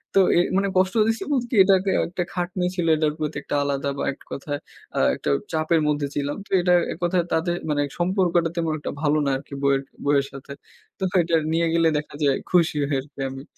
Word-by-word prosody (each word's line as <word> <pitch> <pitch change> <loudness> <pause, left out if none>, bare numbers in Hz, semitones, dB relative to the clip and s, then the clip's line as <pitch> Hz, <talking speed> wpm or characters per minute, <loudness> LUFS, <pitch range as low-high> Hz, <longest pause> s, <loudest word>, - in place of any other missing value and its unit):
তো - - +7 0.2
এ - - +6 0.2
মানে 200 0 +2
কষ্ট 190 +3 +2
দিছি 225 0 0
বলতে 250 -4 0
কি? - - 0
এটাকে 190 0 +3 0.2
একটা 180 +1 -3
খাটনি 180 0 -2
ছিল, 175 -3 -1
এটার 155 -1 +1
প্রতি 155 0 -3
একটা - - -3
আলাদা 140 0 -1
বা - - -2
এক - - -20
কথায় 145 +1 -4 0.4
আ - - +2 0.2
একটা - - -4 0.2
চাপের 155 +1 +2
মধ্যে 145 -1 0
ছিলাম। 145 0 -2
তো - - -28
এটা 180 0 +3 0.2
এক - - -13
কথায় 175 0 +2
তাদের, 170 +2 +1
মানে 145 -1 +1 0.2
সম্পর্কটা 175 -2 +2
তেমন 165 -2 0
একটা - - -4
ভালো 150 0 +2
না 140 - +1
আরকি, 140 - -12
বইয়ের 140 -1 +3 0.2
বইয়ের 140 -1 +3
সাথে। 140 +1 -10 0.5
তো 190 - -4 0.2
এইটা 165 0 +1 0.2
নিয়ে 165 0 +2
গেলে 165 -1 +3
দেখা 150 -1 -6
যায় 140 -2 +3
খুশি 170 -4 +3
হই 140 - +1
আরকি 140 0 -17
আমি, 135 +1 -8
160 Hz, 210 wpm, -23 LUFS, 145-180 Hz, 0.5 s, তো